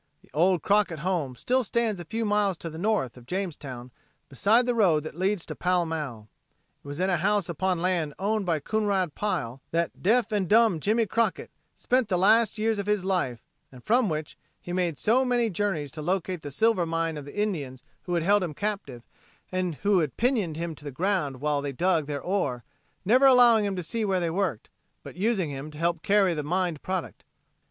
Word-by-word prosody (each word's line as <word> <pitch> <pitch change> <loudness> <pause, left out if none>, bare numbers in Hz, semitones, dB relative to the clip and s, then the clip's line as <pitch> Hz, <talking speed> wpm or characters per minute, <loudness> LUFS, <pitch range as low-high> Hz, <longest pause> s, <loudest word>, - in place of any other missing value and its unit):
The - - -24
old 175 +1 +2
Crockett 200 -5 +2
home 165 -9 -1
still 255 - 0
stands 225 -2 0
a - - -9
few 225 +7 -3
miles 205 -3 +1
to 165 - -7
the 160 - -8
north 195 - 0
of 120 -1 -15
Jamestown 145 -10 -5 0.4
beside 215 - +3
the 245 - +1
road 180 -10 +3
that 155 - -7
leads 190 +2 -1
to - - -6
Pall 180 -1 +1
Mall. 145 -10 -5 0.6
It - - -14
was 145 +2 -6
in 190 +1 +1
a 180 - +2
house 200 +2 +1
upon 180 +1 -1
land 170 -5 0
owned 210 +2 0
by 165 -5 0
Coonrod 200 -3 0
Pile 135 - -3
that 170 0 -2
"Deaf 225 +3 +2
and 200 -4 0
Dumb 220 -6 +4
Jimmy 220 +7 +2
Crockett" 225 -1 -1 0.2
spent 255 -2 +1
the 185 - +1
last 220 +4 +4
years 220 0 0
of 200 - -3
his 210 -3 0
life, 155 -12 -1 0.3
and 125 -2 -14
from 240 -1 +2
which 155 -1 -5 0.2
he 175 - -7
made 175 -5 0
so 235 - +3
many 240 -3 +1
journeys 175 -7 -2
to 155 - -7
locate 180 +1 -2
the 145 - -6
silver 185 +3 +2
mine 165 0 -1
of 145 -2 -7
the 145 +8 -7
Indians 145 -12 -2 0.2
who 175 - -1
had 170 - 0
held 205 +3 +4
him 165 -5 -3
captive 195 - -4 0.5
and 185 -3 -1
who 195 -6 +3
pinioned 210 - -1
him 170 0 -3
to 150 - -15
the 145 - -5
ground 145 -3 -1
while 150 -1 0
they 140 0 -3
dug 165 +1 +1
their 145 -2 -4
ore, 145 - -1 0.4
never 255 +7 +5
allowing 240 -4 +6
him 200 -1 -2
to 180 - -4
see 225 +7 -2
where 190 -3 +1
they 170 -2 -1
worked, 180 - -2 0.4
but - - -10
using 190 -4 0
him 140 +2 -6
to 150 - -12
help 165 0 0
carry 200 -2 +3
the 150 - -2
mined 175 0 -1
product. 185 -2 -4
180 Hz, 210 wpm, -26 LUFS, 155-210 Hz, 0.6 s, allowing